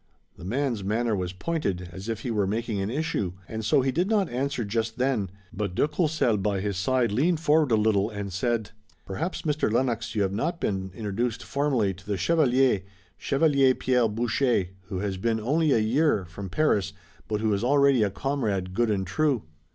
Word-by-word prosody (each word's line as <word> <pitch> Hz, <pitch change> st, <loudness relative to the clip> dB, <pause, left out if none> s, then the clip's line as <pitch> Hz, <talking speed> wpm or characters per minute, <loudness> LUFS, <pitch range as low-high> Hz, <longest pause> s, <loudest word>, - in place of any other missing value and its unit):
The -, -, -13 dB
man's 120 Hz, +1 st, -1 dB
manner 110 Hz, +3 st, 0 dB
was 90 Hz, -2 st, -2 dB
pointed 95 Hz, -, -3 dB
as 95 Hz, +5 st, -7 dB
if 115 Hz, -1 st, -3 dB
he 120 Hz, -, -3 dB
were 105 Hz, -3 st, +1 dB
making 110 Hz, 0 st, -2 dB
an 95 Hz, -, -2 dB
issue, 120 Hz, -, -1 dB
and 110 Hz, 0 st, -5 dB
so 110 Hz, +5 st, +3 dB
he 135 Hz, +1 st, +1 dB
did 175 Hz, +8 st, 0 dB
not 205 Hz, -5 st, +2 dB
answer 130 Hz, -1 st, -1 dB
just 110 Hz, +2 st, -2 dB
then, 125 Hz, -7 st, 0 dB, 0.2 s
but 100 Hz, -4 st, -3 dB
de 145 Hz, -, +3 dB
Courcelles 150 Hz, -, +1 dB
by 100 Hz, 0 st, 0 dB
his 100 Hz, 0 st, -2 dB
side 120 Hz, +4 st, +1 dB
leaned 155 Hz, +9 st, +2 dB
forward 155 Hz, -3 st, +3 dB
a -, -, +6 dB
little 105 Hz, -1 st, +2 dB
and 100 Hz, -3 st, -5 dB
said: 115 Hz, +2 st, -1 dB, 0.3 s
"Perhaps, 160 Hz, -, -4 dB
Mr. 150 Hz, -7 st, 0 dB
Lennox, 115 Hz, -2 st, 0 dB
you 105 Hz, -, +2 dB
have 95 Hz, -, 0 dB
not 150 Hz, -, 0 dB
yet 170 Hz, -, -22 dB
been 95 Hz, -1 st, -2 dB
introduced 110 Hz, +2 st, -2 dB
formally 135 Hz, -9 st, 0 dB
to 95 Hz, +1 st, -15 dB
the 100 Hz, -2 st, -1 dB
chevalier, 130 Hz, -, +3 dB, 0.3 s
Chevalier 140 Hz, -2 st, +3 dB
Pierre 125 Hz, -2 st, +2 dB
Boucher, 115 Hz, -2 st, +1 dB, 0.2 s
who 95 Hz, -1 st, -5 dB
has 95 Hz, 0 st, -2 dB
been 110 Hz, +3 st, 0 dB
only 150 Hz, +7 st, +1 dB
a -, -, +5 dB
year 115 Hz, -, +2 dB
from 95 Hz, +2 st, -8 dB
Paris, 100 Hz, -, +1 dB, 0.3 s
but 105 Hz, -1 st, -1 dB
who 110 Hz, -1 st, +1 dB
is 100 Hz, +2 st, -1 dB
already 140 Hz, -1 st, +4 dB
a 105 Hz, -, +3 dB
comrade 100 Hz, -6 st, -2 dB
good 120 Hz, +3 st, +1 dB
and 100 Hz, -2 st, 0 dB
true." 140 Hz, -, +1 dB
115 Hz, 200 wpm, -26 LUFS, 100-135 Hz, 0.3 s, a